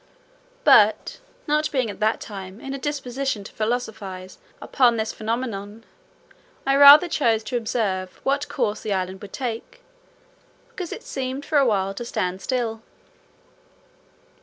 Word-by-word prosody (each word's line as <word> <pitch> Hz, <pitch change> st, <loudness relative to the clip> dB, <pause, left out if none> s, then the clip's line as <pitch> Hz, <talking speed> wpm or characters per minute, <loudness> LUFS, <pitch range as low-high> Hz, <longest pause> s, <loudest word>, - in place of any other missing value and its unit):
But -, -, +4 dB, 0.3 s
not 300 Hz, +1 st, +1 dB
being 260 Hz, -4 st, 0 dB
at -, -, -12 dB
that 215 Hz, +1 st, +1 dB
time 195 Hz, -1 st, -8 dB
in 270 Hz, +2 st, -6 dB
a 275 Hz, -, -5 dB
disposition 270 Hz, -5 st, -3 dB
to -, -, -11 dB
philosophise 215 Hz, -5 st, -4 dB, 0.2 s
upon 245 Hz, -4 st, +2 dB
this 220 Hz, 0 st, -2 dB
phenomenon, 220 Hz, -2 st, -4 dB, 0.8 s
I 275 Hz, 0 st, +3 dB
rather 285 Hz, +4 st, +9 dB
chose 230 Hz, -9 st, +1 dB
to 220 Hz, -, -5 dB
observe 205 Hz, -6 st, -2 dB
what 280 Hz, +2 st, 0 dB
course 210 Hz, 0 st, -1 dB
the 215 Hz, -, -2 dB
island 185 Hz, 0 st, -3 dB
would 205 Hz, -2 st, -10 dB
take, 250 Hz, -, -5 dB, 0.9 s
because 370 Hz, -8 st, -7 dB
it -, -, -7 dB
seemed 265 Hz, +1 st, -4 dB
for 300 Hz, -, +2 dB
a 275 Hz, -, +3 dB
while 195 Hz, -3 st, 0 dB
to 220 Hz, -, -6 dB
stand 185 Hz, -5 st, -3 dB
still. 235 Hz, -4 st, -2 dB
230 Hz, 140 wpm, -23 LUFS, 205-270 Hz, 0.9 s, rather